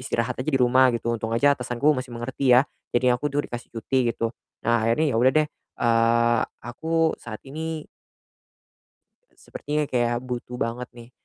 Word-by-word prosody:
istirahat 115 -2 -1
aja 155 - -2
di 135 - +2
rumah 130 +1 +5
gitu 115 0 -4
untung 110 0 -4
aja 140 +5 +4
atasan 120 -1 -5
aku 150 +3 +4
masih 130 -1 -5
mengerti 125 +3 -1
ya, 135 +4 +5 0.3
jadi 125 0 +3
aku 145 +4 -3
dur 145 +1 0
dikasih 120 0 -7
cuti 120 +1 0
gitu. 115 0 -2 0.3
Nah 115 -1 +3
akhirnya 120 +8 +2
ya - - +2
udah 125 +3 +5
deh, 155 -1 +3 0.3
eee, 115 0 +3 0.3
aku 160 +6 0
saat 110 -2 -8
ini 160 +2 -5 1.4
eee, - - -36
sepertinya 150 +1 -3
kayak 120 -1 +1
butuh 125 -1 -5
banget 125 +1 -3
nih, 120 0 -12
125 Hz, 175 wpm, -24 LUFS, 115-140 Hz, 1.4 s, rumah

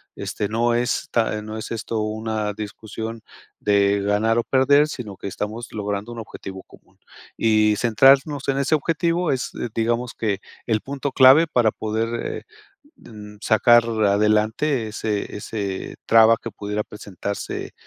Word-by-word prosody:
este, 105 - -3
no 120 +2 +1
está 120 -2 0
no 110 +1 -6
es 110 - -6
esto 115 0 -3
una 110 0 -2
discusión 110 +2 -7 0.4
de 100 0 +2
ganar 105 +3 +1
o - - 0
perder, 140 +4 +4
sino 110 -9 -7
que - - -7
estamos 110 +4 -5
logrando 105 +1 -4
un 120 - -8
objetivo 95 -3 -9
común. - - -21 0.4
Y 110 -1 +3
centrarnos 135 +5 +4
en 135 - +1
ese 140 +3 0
objetivo 165 +3 0
es, 130 -2 -2 0.2
digamos, 120 +2 -1
que 105 -4 -1 0.3
el 110 -3 0
punto 140 0 -4
clave 135 +6 +7
para 120 -7 +2
poder, 110 +2 -2 0.2
eh, - - -5 0.5
mm, 105 -2 -12
sacar 120 +2 +5
adelante 110 +4 +1
ese 105 -1 -3
ese 100 -2 -5
traba 115 0 +6
que 115 - -5
pudiera 105 +1 -4
presentarse 100 -1 -6
110 Hz, 140 wpm, -22 LUFS, 105-120 Hz, 0.5 s, clave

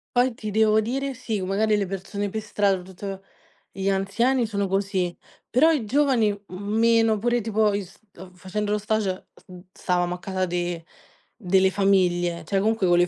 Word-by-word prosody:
Poi, 250 +1 +4
ti 215 -2 -5
devo 215 0 +4
dire, 265 +5 -2
sì, 225 -5 -3
magari 205 +3 +1
le 200 -2 0
persone 200 +2 -4
per 220 +3 -3
strada, 200 -3 0
tutt 190 +1 -7 0.5
gli 195 +1 -2
anziani 230 +7 +1
sono 200 -2 -2
così, 195 -2 -1 0.3
però 310 +7 +4
i 270 -9 0
giovani, 260 -3 +2 0.2
mhmm, 200 +4 -4
meno 225 -1 +4
pure 240 +2 +1
tipo 215 -1 +1
i 200 - -1
s 190 +1 -16 0.2
uhm, 185 +1 -11
facendo 205 +4 -4
lo 210 - +1
stage, 210 -3 -2 0.2
mhmm, 180 -1 -11
stavamo 180 -1 0
a 180 - -7
casa 185 0 -2
de 175 -2 -3 0.5
delle 190 -2 +2
famiglie, 175 -4 +1
cioè, 195 +5 0
comunque 215 -1 +1
con 175 0 +4
le 175 - +4
200 Hz, 180 wpm, -24 LUFS, 185-220 Hz, 0.5 s, Poi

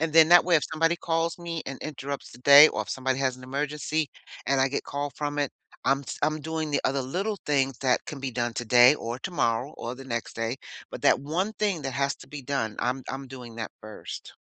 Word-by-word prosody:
And 160 0 0
then 160 0 +7
that 175 0 +8
way 175 -2 +4
if 150 - 0
somebody 165 +2 +2
calls 165 +1 -1
me 170 -2 -4
and 135 -1 -5
interrupts 140 -2 -5
the - - -13
day 140 +4 +9
or - - -3
if - - -14
somebody 130 0 -1
has 130 -2 0
an 130 - -14
emergency 150 +3 -2 0.4
and 135 +2 +2
I 135 - +3
get 140 - -3
call 145 0 -3
from 145 0 -3
it, 145 - 0 0.3
I'm 135 +1 +3
s 140 - -7
I'm 155 +1 +1
doing 160 0 -3
the 145 - +1
other 135 0 +1
little 195 +11 -2
things 135 -3 +1
that 130 -2 +2
can 140 -3 -7
be 135 - -3
done 120 -1 -2
today 120 +3 +6
or 120 -4 -5
tomorrow 130 -4 -1
or 120 +1 -5
the 135 - -10
next 120 -3 -4
day. 115 +2 -2 0.4
But - - -7
that - - +5
one 175 +9 -1
thing 195 -8 -1
that 135 -1 -3
has 140 +1 0
to - - -14
be 145 -2 -8
done, 125 -5 -2
I'm 125 +2 -1
I'm 135 0 -6
doing 125 -3 -10
that 115 -2 -5
first. 110 -1 -9
140 Hz, 235 wpm, -27 LUFS, 130-155 Hz, 0.4 s, day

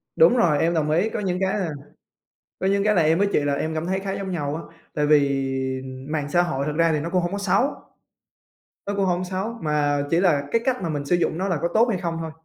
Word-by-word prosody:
Đúng 485 - +6
rồi, 165 -10 +3
em 170 +1 +2
đồng 155 -2 0
ý. 175 +8 +2
Có - - -4
những 185 -3 -1
cái 190 +2 0
là 180 -4 -1 0.9
có 190 - 0
những 200 0 +2
cái 210 0 +2
là 175 - +4
em 160 +1 +3
với 200 +2 +2
chị - - +3
là 145 0 0
em 155 +3 -2
cảm 160 +1 -3
thấy 190 +2 -1
khá 195 0 -4
giống 195 -1 -4
nhau 145 -4 -2
á. 165 +1 -10 0.2
Tại 150 - 0
vì 140 -2 +3 0.7
mạng 150 -2 -2
xã 175 +4 +3
hội 140 -6 -1
thực 150 0 -3
ra 165 0 +3
thì 155 - 0
nó 165 - -4
cũng 180 0 +1
hổng 175 - -2
có 200 - -2
xấu 200 +3 +2 1.2
nó 200 - -2
cũng 200 -1 +1
hổng 180 0 0
xấu, 190 +5 -3
mà 145 -2 +1
chỉ 170 - +3
là 170 -7 +3
cái 230 - +3
cách 255 -4 0
mà 170 - -2
mình 145 -2 -3
sử 175 +5 +2
dụng 170 -1 -1
nó 190 - -1
là 175 -5 0
có 170 - +1
tốt 225 +2 +5
hay 195 - -1
không 170 -2 -2
thôi. 160 -1 -4
170 Hz, 275 wpm, -23 LUFS, 150-190 Hz, 1.2 s, Đúng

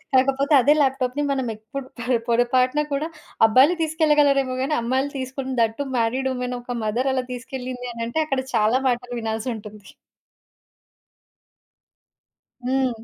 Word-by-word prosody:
కాకపోతే 275 +3 +3
అదే 290 +4 +4
ల్యాప్‌టాప్‌ని 270 +1 0
మనం 265 -2 -1
ఎప్పుడు 230 +5 -8
పొర 245 +1 +1
పొరపాటున 255 +4 +2
కూడా 300 +4 -1 0.4
అబ్బాయిలు 260 +10 +5
తీసుకెళ్లగలరేమో 295 -4 +2
గాని 300 +3 0
అమ్మాయిలు 260 +4 0
తీసుకొని 260 0 -4
దట్ 225 -1 +1
టూ 285 - -1
మ్యారీడ్ 250 +3 0
వుమెన్ 250 0 -3
ఒక 245 0 -5
మదర్ 240 +5 0
అలా 255 -1 -1
తీసుకెళ్లింది 250 0 -6
అనంటే 230 +5 -3
అక్కడ 270 -3 -1
చాలా 220 +4 +3
మాటలు 245 0 -2
వినాల్సుంటుంది. 220 -2 -5 2.8
హ్మ్. 265 0 +2
255 Hz, 125 wpm, -23 LUFS, 240-275 Hz, 2.8 s, అబ్బాయిలు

